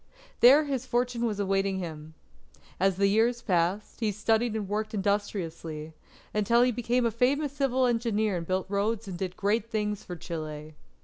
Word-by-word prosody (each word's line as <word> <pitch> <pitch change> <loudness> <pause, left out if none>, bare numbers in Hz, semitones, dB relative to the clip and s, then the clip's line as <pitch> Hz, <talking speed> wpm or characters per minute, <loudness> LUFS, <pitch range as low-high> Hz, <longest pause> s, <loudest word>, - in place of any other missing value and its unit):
There 275 +6 +8
his 265 -3 -3
fortune 240 -1 0
was 210 -2 -3
awaiting 195 -1 +1
him. 160 -3 -7 0.6
As 195 0 +3
the 200 - +3
years 225 +4 +2
passed, 180 +2 0
he 220 -3 +1
studied 220 +2 +1
and 210 -3 -3
worked 215 +2 -2
industriously, 170 -6 -2 0.4
until 220 +3 +3
he 250 - +3
became 245 +1 0
a 230 - +2
famous 270 +5 +1
civil 265 -2 +1
engineer 225 -4 +1
and 165 -1 -6
built 185 0 0
roads 205 +2 -1
and 190 - -5
did 185 0 -4
great 210 +2 0
things 210 -1 -2
for 180 - -7
Chile. 155 -2 -6
210 Hz, 170 wpm, -28 LUFS, 190-235 Hz, 0.6 s, There